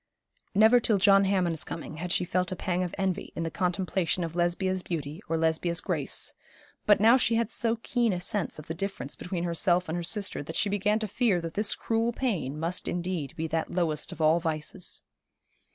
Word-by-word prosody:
Never 220 +4 +7
till 220 -3 +2
John 195 0 +5
Hammond's 180 -5 +1
coming 160 -1 -7
had 175 +2 -3
she 180 - +1
felt 180 +1 0
a - - -2
pang 180 0 -1
of 180 -2 -3
envy 190 -2 -2
in 165 - -2
the 165 - -3
contemplation 180 0 0
of 165 0 -5
Lesbia's 180 +2 0
beauty 155 -1 -5
or 165 - +1
Lesbia's 165 +1 +1
grace; - - -1 0.5
but 210 -1 +6
now 225 +4 +6
she 230 -3 +2
had 230 -1 0
so 230 0 +1
keen 240 -3 +1
a 180 - -1
sense 190 0 -1
of 155 - -9
the 160 - -4
difference 195 -5 -4
between 180 -1 -4
herself 175 +1 +2
and 160 - -2
her 175 - -2
sister 195 +1 0
that 160 +3 -7
she 205 - +1
began 205 +1 +1
to 220 -1 -2
fear 205 -3 +1
that 165 -1 -5
this 210 0 +1
cruel 225 +1 0
pain 180 - -2
must 170 +3 -2
indeed 175 -5 -3
be 160 - -3
that 160 0 -2
lowest 165 -4 -1
of - - -9
all 160 +2 +4
vices. 155 -2 -2
180 Hz, 205 wpm, -28 LUFS, 165-200 Hz, 0.5 s, Never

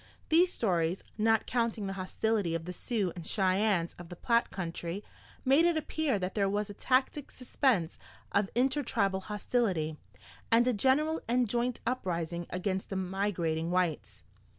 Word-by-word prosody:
These 350 +3 +5
stories, 175 - 0
not 225 0 +2
counting 230 -4 -1
the 195 - -3
hostility 195 -1 -1
of 165 -1 -4
the 180 - -5
Sioux 200 -2 -2
and 175 - -7
Cheyennes 190 -1 +1
of 175 -1 -10
the 175 - -7
Platte 235 +6 +1
country, 175 +1 -4 0.4
made 275 +5 +5
it 340 -1 +3
appear 310 -5 0
that 185 0 -3
there 200 -2 +1
was 205 +1 -1
a - - -8
tacit 260 +6 0
suspense 245 - 0 0.3
of 200 -1 +2
intertribal 245 -7 +1
hostility, 190 -6 -1 0.5
and 235 +2 +5
a 250 - +3
general 285 +8 +2
and 245 +1 +2
joint 240 +2 -1
uprising 175 -8 -2
against 185 +1 -2
the 195 - -4
migrating 180 -4 -1
whites. 165 - -1
200 Hz, 150 wpm, -31 LUFS, 180-245 Hz, 0.5 s, These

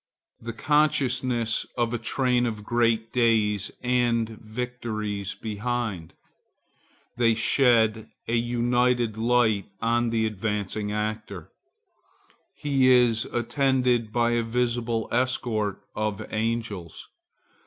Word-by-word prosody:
The 115 0 -6
consciousness 130 -4 +1
of 120 -1 0
a 120 - -1
train 125 +1 +1
of 110 -2 -5
great 115 -1 +1
days 110 -4 +2
and 120 -2 +1
victories 110 -3 -5
behind. 110 -5 -4 1.0
They 115 -2 +3
shed 110 -2 +3 0.2
an 115 - -2
united 120 -1 +1
light 110 -3 +2
on 120 +1 +1
the 115 -1 +1
advancing 105 -1 -2
actor. 105 -4 -4 1.0
He 135 -3 +2
is 120 -3 +4
attended 125 0 +1
as - - -22
by 120 +1 +2
a 120 0 +2
visible 115 -1 -1
escort 115 -5 -1
of 105 -2 -2
angels. 110 -6 -3
115 Hz, 100 wpm, -25 LUFS, 110-120 Hz, 1.0 s, is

